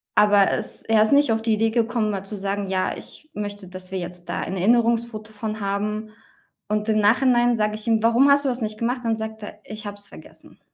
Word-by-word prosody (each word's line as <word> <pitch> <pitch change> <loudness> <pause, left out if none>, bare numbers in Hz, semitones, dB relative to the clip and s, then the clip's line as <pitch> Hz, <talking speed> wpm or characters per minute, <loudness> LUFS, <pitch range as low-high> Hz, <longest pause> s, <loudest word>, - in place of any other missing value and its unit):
aber 205 -1 +5
es 215 - -2
er 220 -1 +4
ist 220 - +2
nicht 285 -4 +4
auf 225 0 +1
die 225 -1 +1
Idee 225 +1 +2
gekommen, 230 -2 0
mal 195 -1 -4
zu 210 +2 -6
sagen: 200 0 -3
„Ja, 190 -1 -1
ich 310 - -10
möchte, 205 -2 -6
dass 185 0 -9
wir 190 - -2
jetzt 175 0 -6
da - - -2
ein 190 +2 -4
Erinnerungsfoto 230 +1 +1
von 215 0 -5
haben.“ 210 +2 -2 0.6
Und 210 +1 -1
im 215 0 +3
Nachhinein 240 +2 +4
sage 210 0 0
ich 215 +2 -5
ihm: 220 -1 +3
„Warum 240 +5 +5
hast 285 0 +4
du - - +2
das 245 -1 -3
nicht 215 0 -3
gemacht?”, 245 +2 -1
dann 225 -1 +1
sagt 220 -1 -6
er: 210 0 -9
„Ich 215 0 -8
habe 205 0 -6
es 205 -1 -9
vergessen.” - - -14
215 Hz, 235 wpm, -23 LUFS, 205-230 Hz, 0.6 s, aber